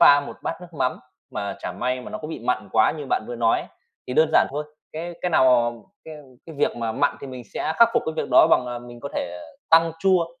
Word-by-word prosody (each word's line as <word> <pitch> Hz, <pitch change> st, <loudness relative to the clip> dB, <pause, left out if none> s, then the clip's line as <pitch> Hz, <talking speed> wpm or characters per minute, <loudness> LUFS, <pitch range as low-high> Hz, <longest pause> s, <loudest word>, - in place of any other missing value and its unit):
pha 145 Hz, -4 st, +8 dB
một 140 Hz, -, -8 dB
bát 165 Hz, -, -4 dB
nước 175 Hz, -2 st, -12 dB
mắm 130 Hz, -4 st, -1 dB, 0.3 s
mà 100 Hz, -1 st, -4 dB
chẳng -, -, -6 dB
may 125 Hz, 0 st, -1 dB
mà -, -, -9 dB
nó -, -, -5 dB
có 155 Hz, -, -7 dB
bị 160 Hz, -, -5 dB
mặn 115 Hz, -3 st, -2 dB
quá 110 Hz, -, +4 dB
như 145 Hz, -, -6 dB
bạn 120 Hz, -, 0 dB
vừa 120 Hz, -, -6 dB
nói 115 Hz, -1 st, +2 dB
ấy, -, -, -10 dB, 0.4 s
thì 125 Hz, -, -4 dB
đơn 160 Hz, +3 st, +5 dB
giản -, -, +5 dB
thôi, 150 Hz, +2 st, -3 dB, 0.3 s
cái 170 Hz, +2 st, -5 dB
cái 180 Hz, -, 0 dB
nào 125 Hz, -6 st, +4 dB
mà 120 Hz, -, -12 dB, 0.3 s
cái 160 Hz, -1 st, -9 dB, 0.3 s
cái 165 Hz, -, -9 dB
việc -, -, +1 dB
mà 115 Hz, -1 st, -2 dB
mặn 145 Hz, +4 st, +1 dB
thì -, -, -7 dB
mình 130 Hz, -2 st, -8 dB
sẽ 155 Hz, -, -1 dB
khắc 235 Hz, -, +7 dB
phục 240 Hz, -, +3 dB
cái 160 Hz, -, -1 dB
việc -, -, -3 dB
đó 125 Hz, -, +7 dB
bằng, 125 Hz, -, +3 dB
à, 120 Hz, 0 st, -4 dB
mình 120 Hz, 0 st, -11 dB
có 140 Hz, -, -4 dB
thể 90 Hz, 0 st, -3 dB, 0.3 s
tăng 165 Hz, 0 st, +5 dB
chua, 185 Hz, -1 st, +3 dB
135 Hz, 270 wpm, -23 LUFS, 120-160 Hz, 0.4 s, pha